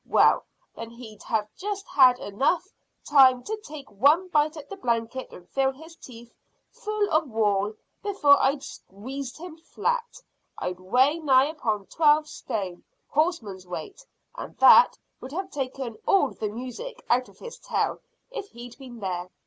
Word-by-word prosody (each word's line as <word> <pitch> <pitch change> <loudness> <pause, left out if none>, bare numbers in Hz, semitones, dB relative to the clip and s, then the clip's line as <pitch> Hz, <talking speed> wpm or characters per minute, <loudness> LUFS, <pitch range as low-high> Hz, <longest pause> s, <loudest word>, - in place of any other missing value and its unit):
"Well, - - +4 0.3
then 230 0 -7
he'd 230 -3 -12
have 215 -2 -1
just 400 +1 -4
had 255 -3 +6 0.9
time 260 -3 +6
to 435 +1 -4
take 295 - -10
one 295 - +3
bite 305 -1 +1
at 300 - -9
the 395 - -7
blanket 235 -6 -2
and 180 - -14
fill 270 -1 +1
his 320 +5 -14
teeth 235 -5 -13 0.4
full 425 -1 -2
of 310 -2 +2
wool 210 -2 0 0.3
before 345 -9 +4
I'd 275 +1 +1
squeezed 250 +7 -8
him 330 0 -9
flat. 475 +8 -3 0.4
I - - -2
weigh 250 - +2
nigh 275 -2 +4
upon 215 -10 -2
twelve 305 +2 +3
stone, 200 -11 -5 0.3
horseman's 230 - -1
weight, 390 - -7 0.3
and - - -9
that 480 - +7 0.2
would 260 +2 -9
have 380 +3 -4
taken 260 -4 -5
all 335 -9 +4
the 215 - -4
music 255 - -8
out 250 +1 +1
of - - -20
his 475 - -10
tail - - -2 0.3
if 410 -5 -6
he'd 240 +1 -11
been 245 -4 -11
there. 180 -2 -3
265 Hz, 155 wpm, -26 LUFS, 225-320 Hz, 0.9 s, that